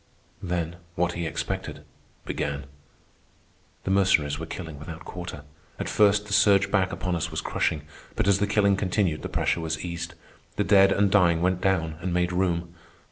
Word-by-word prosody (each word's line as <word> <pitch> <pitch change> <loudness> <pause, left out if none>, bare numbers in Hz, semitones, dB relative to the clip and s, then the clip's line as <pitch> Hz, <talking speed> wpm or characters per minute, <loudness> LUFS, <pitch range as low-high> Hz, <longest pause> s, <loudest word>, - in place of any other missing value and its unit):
Then, 85 -2 -2 0.2
what 90 0 +1
he 85 -1 -3
expected, - - -4 0.4
began. 70 -1 -3 1.2
The 95 - -2
Mercenaries 80 -7 +3
were 80 - -5
killing 80 -6 -7
without 80 +2 -9
quarter. 90 -5 -7 0.3
At - - -4
first, 105 0 +4
the 105 - -5
surge 100 -1 +4
back 95 -2 +2
upon 90 -2 -2
us 85 +1 -2
was 80 - -3
crushing, 75 -2 -1 0.3
but - - 0
as 100 -1 +4
the 105 - +1
killing 100 -1 +3
continued 95 -4 0
the - - -5
pressure 85 - 0
was 80 +1 -3
eased. 85 0 -5 0.4
The - - +1
dead 100 -1 +6
and 100 0 +2
dying 85 -4 +4
went 90 0 +1
down 80 -5 0
and 90 0 -2
made 90 0 +1
room. 85 -2 0
90 Hz, 175 wpm, -26 LUFS, 80-100 Hz, 1.2 s, dead